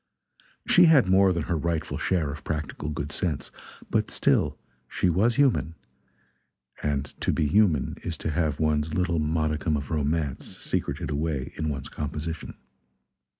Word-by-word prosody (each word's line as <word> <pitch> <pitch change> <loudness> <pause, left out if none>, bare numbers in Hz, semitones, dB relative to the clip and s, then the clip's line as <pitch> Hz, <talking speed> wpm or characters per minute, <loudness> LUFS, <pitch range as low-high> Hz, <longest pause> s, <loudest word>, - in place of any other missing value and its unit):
She 180 - +7
had 150 - +6
more 95 +1 +5
than 85 -3 -1
her 85 - -1
rightful 80 0 -2
share 80 -6 0
of 75 +1 -8
practical 75 -1 -4
good 75 -1 -4
sense, 75 -2 -3 0.4
but - - +1
still - - +1 0.3
she 90 - +1
was 110 +7 +2
human; 130 - +2 1.1
and 70 -2 0 0.2
to - - +1
be - - +1
human 80 -2 +2
is - - -4
to 80 - -3
have 75 -1 0
one's 75 0 +1
little 90 -2 +1
modicum 75 0 0
of 70 +1 -6
romance 75 -1 -1
secreted - - -2
away 75 -3 -2
in 80 - -2
one's 70 -2 -4
composition. 75 +2 -5
80 Hz, 150 wpm, -26 LUFS, 75-85 Hz, 1.1 s, She